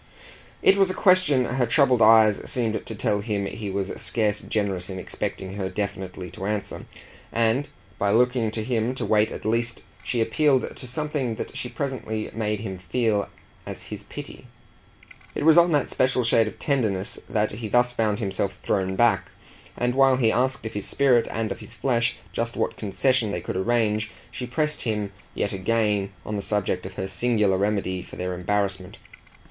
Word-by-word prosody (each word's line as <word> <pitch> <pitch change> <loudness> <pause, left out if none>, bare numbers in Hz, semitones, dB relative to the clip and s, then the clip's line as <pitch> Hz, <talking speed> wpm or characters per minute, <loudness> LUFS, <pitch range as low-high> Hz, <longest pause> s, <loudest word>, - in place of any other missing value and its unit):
It 195 - +6
was 195 -1 +4
a 185 - -2
question 180 -9 +4
her 125 0 0
troubled 125 -1 +4
eyes 110 -1 +6
seemed 115 -3 0
to 110 - -3
tell 105 0 0
him 100 -2 -2
he 105 +1 -5
was 95 0 -2
scarce 105 -3 +1
generous 100 -4 -2
in 95 - -5
expecting 95 0 -4
her 95 -2 -2
definitely 95 -2 -4
to 95 - -5
answer, 105 -1 -4 0.4
and 115 +5 +1 0.3
by 100 - +2
looking 120 +1 +3
to 110 0 -2
him 120 +1 0
to - - -3
wait 105 0 +3
at - - -7
least 115 +2 0 0.2
she 120 - -1
appealed 130 +4 +2
to 130 - -8
something 140 -3 -2
that - - -6
she 125 - -4
presently 125 -7 -4
made 105 -1 -2
him 95 -4 -5
feel 105 +2 0 0.4
as - - -6
his - - -6
pity. - - -10 0.9
It - - -2
was 160 -1 +7
on 170 0 +6
that 145 -3 +2
special 130 -1 +1
shade 115 -1 +4
of - - -7
tenderness 110 - 0
that 105 -1 +1
he 110 +2 -5
thus 120 +3 +3
found 110 -3 +1
himself 100 -3 -2
thrown 95 -1 0
back; 95 -6 +3 0.5
and 125 0 +1
while 135 0 +5
he 115 -4 +3
asked 130 0 0
of 110 - -4
his 105 - -3
spirit 130 -4 +3
and 110 -2 -2
of - - -4
his 105 - -11
flesh 120 -3 0 0.2
just 115 0 -2
what - - 0
concession 115 +2 +1
they 90 - -2
could - - -5
arrange 110 +1 +1 0.2
she 125 - -5
pressed 150 +4 -1
him 105 -4 -2 0.2
yet 100 - -1
again 105 0 0
on 105 - -3
the - - -2
subject 95 -3 -1
of 95 - -12
her 95 - -3
singular 105 -1 +1
remedy 100 -2 0
for - - -11
their 90 0 -3
embarrassment. 95 0 -2
110 Hz, 185 wpm, -25 LUFS, 100-125 Hz, 0.9 s, was